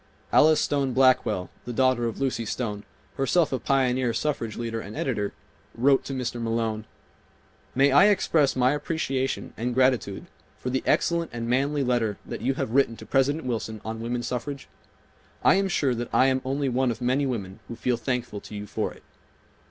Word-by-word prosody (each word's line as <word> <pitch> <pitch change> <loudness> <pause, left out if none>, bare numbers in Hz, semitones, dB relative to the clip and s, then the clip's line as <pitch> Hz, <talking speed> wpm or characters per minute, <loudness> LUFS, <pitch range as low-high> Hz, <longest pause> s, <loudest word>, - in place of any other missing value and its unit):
Alice 155 +1 +6
Stone 140 -3 0
Blackwell, 125 -8 +3
the 125 - -4
daughter 125 -1 +2
of 115 - -5
Lucy 135 -4 -1
Stone, 105 -2 -3 0.4
herself 145 +3 +2
a 130 - 0
pioneer 125 -2 +1
suffrage 115 -4 -2
leader 115 -1 -3
and 105 +1 -9
editor, 105 -7 -1 0.4
wrote 135 +3 +3
to 135 - -4
Mr. 125 -2 -3
Malone: 115 -1 -1 0.9
"May 135 +2 +4
I 145 +9 +7
express 165 -8 +3
my 130 0 +3
appreciation 140 -3 -2
and 120 +2 -2
gratitude 130 -6 +1 0.3
for 125 - -4
the 130 - 0
excellent 170 -1 +2
and 115 0 -4
manly 140 +4 +1
letter 120 -5 0
that - - -6
you 130 +3 0
have 110 - -3
written 120 -3 +2
to - - -10
President 140 +2 +1
Wilson 110 -3 -3
on 110 0 -4
woman 120 +1 -2
suffrage? 125 +4 -4 0.8
I - - +6
am 195 +1 +2
sure 145 -8 +1
that 120 0 -4
I 130 - +4
am 130 0 +2
only 135 +2 -1
one 130 0 +1
of 115 - -3
many 130 +3 +1
women 100 -6 -4
who 115 - -6
feel 125 +2 0
thankful 120 -3 -3
to 105 - -10
you 105 0 -5
for - - -3
it. - - -16
125 Hz, 185 wpm, -26 LUFS, 115-135 Hz, 0.9 s, I